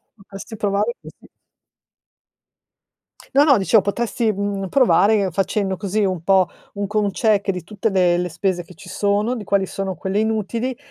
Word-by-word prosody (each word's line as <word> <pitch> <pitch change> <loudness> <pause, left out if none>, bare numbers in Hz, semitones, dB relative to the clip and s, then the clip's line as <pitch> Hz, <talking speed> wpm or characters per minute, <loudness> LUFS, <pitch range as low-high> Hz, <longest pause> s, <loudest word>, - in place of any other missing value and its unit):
potresti 195 +1 -10
provare 205 +2 0
così. - - -15 2.0
No, 280 +2 +5
no 275 -4 +5
dicevo 200 +2 +3
potresti, 225 +2 -1
mhmm, 200 -1 -3
provare 215 -6 +3
facendo 195 +1 -1
così 205 +2 -1
un 185 -4 -2
po' 190 0 +3 0.3
un 200 0 -3
con 210 0 0
check 210 -2 +1
di 180 -3 -4
tutte 210 +4 -2
le 180 -3 +2
le 180 0 -1
spese 175 +1 -2
che 175 +1 -16
ci 180 - -14
sono, 205 +5 0
di 220 - -6
quali 200 0 +1
sono 195 0 -4
quelle 190 +4 -2
inutili 225 +3 -2
200 Hz, 160 wpm, -20 LUFS, 190-215 Hz, 2.0 s, No